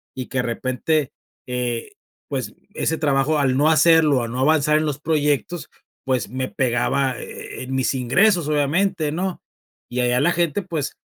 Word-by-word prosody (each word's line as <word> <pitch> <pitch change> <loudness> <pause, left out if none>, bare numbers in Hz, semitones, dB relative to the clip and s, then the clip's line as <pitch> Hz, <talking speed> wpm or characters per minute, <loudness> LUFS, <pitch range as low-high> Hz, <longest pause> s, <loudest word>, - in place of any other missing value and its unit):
y 130 -1 -6
que, 130 - -2
de - - +3
repente, 130 +5 -1 0.4
eh, 125 - -3 0.4
pues, 130 -7 -4 0.2
ese 160 - -1
trabajo, 145 0 +1
al 135 -3 +2
no 145 +4 +4
hacerlo, 155 -4 +5
al 115 - -5
no 125 - -4
avanzar 150 +2 +3
en 155 - -1
los 145 -1 -3
proyectos, 150 +1 -1 0.4
pues, 125 -7 0
me 130 +2 -3
pegaba 130 +1 0
e - - -8
e - - -4
en 130 - -4
mis 130 +1 +1
ingresos, 170 - +2
obviamente, 155 +3 +1
¿no? 180 +3 -3 0.5
Y 125 - -2
allá 125 0 +2
la 175 - +3
gente, 170 +1 0
pues, 165 -6 -4
140 Hz, 175 wpm, -22 LUFS, 130-160 Hz, 0.5 s, hacerlo